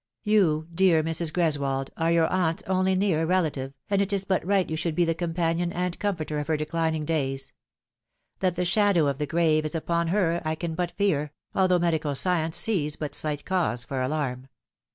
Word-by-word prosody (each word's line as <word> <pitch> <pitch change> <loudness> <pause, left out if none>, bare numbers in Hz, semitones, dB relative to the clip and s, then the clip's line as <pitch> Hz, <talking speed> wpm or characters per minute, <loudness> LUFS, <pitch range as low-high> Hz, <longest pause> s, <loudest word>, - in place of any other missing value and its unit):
" - - -62
You, 180 -8 +2
dear 170 -3 +4
Mrs. 165 0 +1
Greswold, 140 -6 0
are 165 0 +1
your 170 -1 +4
aunt's 170 -2 0
only 190 0 +1
near 180 -5 +1
rela 180 -3 +2
tive, 135 0 -7
and 200 -1 +1
it 200 0 -1
is 195 -1 -1
but 190 -1 0
right 195 0 +1
you 160 - -3
should 160 0 -2
be 175 - +3
the 165 - +1
companion 170 0 -1
and 180 0 -3
comforter 160 -7 -2
of 145 - -4
her 160 -1 +1
declining 160 0 -1
days. 135 -4 -2 0.9
That 185 -2 +1
the 180 0 -1
shadow 195 -3 +3
of 140 -1 -1
the 150 - -1
grave 155 0 +2
is 155 +1 -3
upon 170 +1 0
her 170 -2 +1
I 155 0 -1
can 165 0 -4
but 175 +1 -1
fear, 155 -8 0 0.2
although 185 -1 +3
medical 160 -4 0
science 165 0 +1
sees 160 -10 +1
but 150 -2 -5
slight 150 -2 -3
cause 165 -10 0
for 130 +2 -3
alarm. 130 -2 -2
165 Hz, 200 wpm, -26 LUFS, 155-180 Hz, 0.9 s, dear